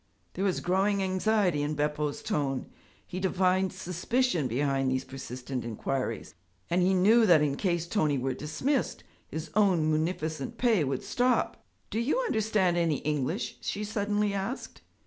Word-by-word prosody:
There 195 - -3
was 190 - 0
growing 195 +2 +1
anxiety 185 -3 +1
in 150 +1 -1
Beppo's 150 0 -1
tone. 135 -3 -2 0.3
He 185 - -5
divined 185 0 +2
suspicion 185 - 0
behind 135 +2 0
these 130 0 0
persistent 130 -1 -6
inquiries, 115 +1 -3 0.4
and 180 +1 +3
he 185 +2 +3
knew 220 +5 +5
that 165 -5 +6
in 140 -2 +1
case 170 -1 0
Tony 155 -6 +1
were 130 +1 -1
dismissed, 260 - -1 0.2
his 160 0 -6
own 190 -7 +3
munificent 155 -2 -2
pay 225 -9 +3
would 135 -2 -2
stop. 250 -1 0 0.3
'Do 220 - -1
you 250 - +1
understand 215 - +1
any 165 -4 +2
English?' 150 - -2
she 210 - -3
suddenly 210 -1 0
asked. 200 +7 -4
175 Hz, 145 wpm, -29 LUFS, 145-205 Hz, 0.4 s, that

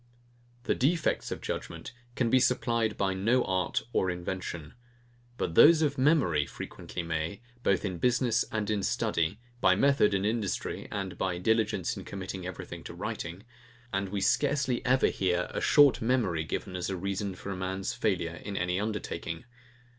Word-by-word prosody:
The - - +1
defects 155 +5 +1
of - - -5
judgement - - -5 0.2
can 120 -3 +1
be 130 - +6
supplied 115 -3 +1
by 95 -1 +1
no 115 +7 +2
art 95 -1 0
or 95 - +2
invention; 90 -3 -4 0.6
but 80 - -2
those 160 - +7
of 145 -3 0
memory 130 - +3
frequently 90 - -6
may, 80 +3 -3 0.2
both 100 -3 +1
in 90 -4 -3
business 120 0 +2
and 105 -2 -1
in 105 -2 0
study, 90 +1 0 0.2
by 95 -4 +5
method 120 -3 +4
and 95 +1 0
industry, 110 -2 -2
and 95 -2 -4
by 90 -2 0
diligence 110 -1 +1
in - - -6
committing 95 -1 -6
everything 95 - -7
to - - -7
writing; 85 +4 -5 0.5
and 95 0 -1
we 100 0 -2
scarcely 140 +2 +1
ever 130 +1 +4
hear 90 -2 +1
a - - -3
short 145 -4 +6
memory 110 -10 +1
given 90 +3 -4
as 90 +1 -2
a 95 - -2
reason 100 +1 -3
for 100 - -6
a - - -3
man's 95 +1 -3
failure 85 -5 -1
in 100 -1 -4
any 90 +1 0
undertaking. 105 -5 -4
100 Hz, 165 wpm, -29 LUFS, 90-120 Hz, 0.6 s, those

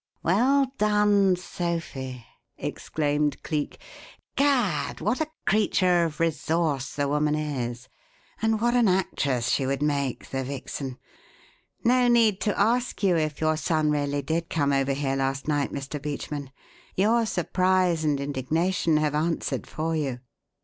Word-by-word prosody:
"Well 255 - +3
done, 210 -2 +4
Sophie!" 165 -9 -4 0.3
exclaimed 150 -1 -1
Cleek. 150 -2 -3 0.6
"Gad! 250 - +1
what 230 +8 0
a 310 - -1 0.2
creature 185 -4 +3
of 155 -2 -5
resource 160 -3 0
the 145 -1 0
woman 150 +1 +1
is, 125 -5 -3 0.5
and 225 -1 +2
what 240 +2 +2
an 240 -3 +4
actress 140 -10 0
she 135 - +1
would 140 +1 -1
make, 140 -3 -1
the 135 0 -1
vixen! 135 0 -5 0.9
No 250 +1 +4
need 230 -4 +4
to 210 - 0
ask 240 +2 +1
you 185 -3 +4
if 155 -3 -1
your 155 0 +2
son 155 -1 +1
really 145 -1 -1
did 165 +4 -2
come 145 -3 +1
over 135 0 +1
here 135 -1 -1
last 135 +1 -1
night, 145 -2 0
Mr. 140 +1 -5
Beachman; 145 -1 -5 0.5
your 225 +4 +3
surprise 185 -2 +1
and 150 -2 +1
indignation 155 +5 0
have 150 -1 +1
answered 160 +3 -1
for 160 +1 -2
you." 135 -5 -2
155 Hz, 140 wpm, -26 LUFS, 140-190 Hz, 0.9 s, done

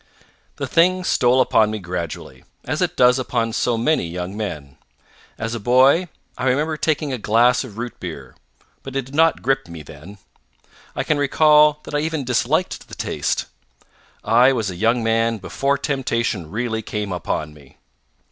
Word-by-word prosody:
The - - -4
thing 185 +2 +2
stole 125 -6 +3
upon 110 -4 +3
me 110 - -3
gradually, 85 -8 -6 0.2
as 150 +7 -2
it 180 -1 -1
does 125 +1 +5
upon 115 -3 -1
so 120 0 0
many 120 - +1
young 90 +3 -5
men. 75 -11 -6 0.6
As 115 +1 -4
a 120 - -3
boy, 130 - +4 0.3
I 125 - -2
remember 150 +5 +1
taking 150 -2 -1
a 125 - -3
glass 120 +5 +3
of 110 -5 -11
root 120 0 -6
beer, 75 -8 -8 0.5
but 135 0 -9
it 135 -2 -1
did 135 - -14
not 165 +2 +3
grip 135 +1 0
me 85 -2 -9
then. 80 +8 -12 0.8
I - - -1
can 155 -2 0
recall 150 +1 +4
that - - -10
I 145 - +1
even 155 -1 -2
disliked 130 +8 -1
the - - -10
taste. - - -2 0.8
I 120 +5 +5
was 110 -7 -1
a - - -8
young 115 +5 +1
man 115 0 +1
before 140 +8 -1
temptation 115 - -2
really 110 +2 -2
came 105 -2 -4
upon 75 -3 -3
me. 70 -3 -19
120 Hz, 170 wpm, -21 LUFS, 105-140 Hz, 0.8 s, does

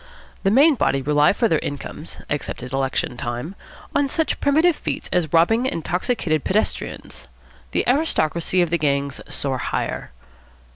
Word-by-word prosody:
The 195 - +2
main 280 +9 +6
body 135 - +1
rely 150 +1 +4
for 230 +3 +1
their 160 -7 +2
incomes, 145 - -6
except - - -3
at 125 +1 -7
election 135 -2 -1
time, 120 +9 -4 0.4
on 285 -1 +2
such 320 +3 -1
primitive 315 +4 +3
feats - - -4
as 165 -4 +1
robbing 225 +10 +4
intoxicated 175 - -1
pedestrians. 70 - -2 0.4
The - - 0
aristocracy 180 - +2
of 170 - -3
the 170 - +2
gangs 140 -1 0
soar 135 -2 -2
higher. - - -3
165 Hz, 145 wpm, -22 LUFS, -, 0.4 s, main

